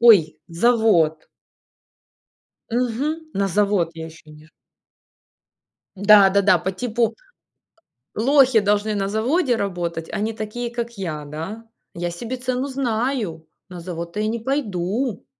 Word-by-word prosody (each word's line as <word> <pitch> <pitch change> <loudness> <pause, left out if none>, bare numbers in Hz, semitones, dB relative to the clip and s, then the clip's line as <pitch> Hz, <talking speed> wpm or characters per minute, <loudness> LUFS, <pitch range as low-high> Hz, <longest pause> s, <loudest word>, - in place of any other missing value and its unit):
ой, 175 -10 +6
завод". 170 -5 +2 1.4
Мгм. 260 +7 -2
На 200 0 0
завод 200 -3 +1
я 160 0 -6
еще 160 -1 -14
не 150 0 -15
ш - - -27 1.5
Да-да-да, 200 0 +6
по 190 - -3
типу- 230 +3 -1 1.0
лохи 260 0 +5
должны 205 +1 +1
на 195 -1 -1
заводе 245 - +1
работать, 175 -5 -3
а 215 - -3
не 220 +2 -1
такие, 220 +3 -4
как 235 -1 -4
я, 155 -6 -4
да. 165 +10 -7 0.3
Я 175 0 -3
себе 230 +9 -5
цену 255 +2 -2
знаю, 235 - -2 0.2
на 180 -1 -8
завод-то 170 +2 -6
я 215 - 0
не 230 +1 -2
пойду. 225 -3 -2
210 Hz, 125 wpm, -22 LUFS, 175-240 Hz, 1.5 s, ой